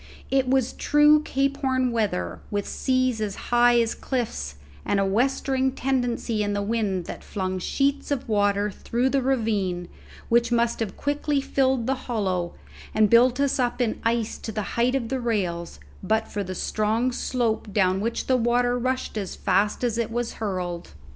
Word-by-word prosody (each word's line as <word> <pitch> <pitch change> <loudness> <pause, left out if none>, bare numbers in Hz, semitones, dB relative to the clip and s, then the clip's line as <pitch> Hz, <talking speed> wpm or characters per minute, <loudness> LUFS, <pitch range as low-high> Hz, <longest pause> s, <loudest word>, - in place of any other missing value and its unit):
It 265 -1 +2
was 260 -1 +2
true 295 +1 +5
Cape 275 -1 0
Horn 260 -2 +1
weather, 205 - -1
with 205 -1 -2
seas 255 -3 0
as 205 -2 -2
high 240 0 +3
as 230 -1 +1
cliffs, 145 - -3 0.3
and 200 - +1
a 195 - +2
westering 260 +5 +1
tendency 245 -4 -1
in 205 0 0
the 205 0 -1
wind 200 -5 -1
that - - -7
flung 185 -2 -3
sheets 280 +8 0
of 285 -4 -2
water 205 -1 +1
through 240 +6 -1
the 275 0 +1
ravine, 210 -9 0 0.4
which 235 +1 +3
must 235 0 +1
have 220 -4 -3
quickly 290 0 0
filled 265 -3 +1
the 265 - +1 0.2
hollow 185 -6 -1 0.4
and 215 -1 +4
built 245 +2 +5
us 280 -1 +1
up 245 0 0
in 235 -3 -1
ice 230 -1 0
to 220 - -5
the 215 -1 -3
height 245 +3 +2
of 235 -4 -1
the 265 0 -1
rails 180 - -2 0.2
but 220 0 0
for 205 - -3
the 185 0 -6
strong 220 +6 0
slope 235 -4 -1
down 190 -1 +2
which 230 +2 -2
the 260 - +3
water 245 +1 +2
rushed 255 -3 -2
as 195 -3 -5
fast 205 +5 +1
as 235 -1 0
it 230 - -1
was 240 +1 -2
hurled. 180 - -4
235 Hz, 175 wpm, -25 LUFS, 205-255 Hz, 0.4 s, true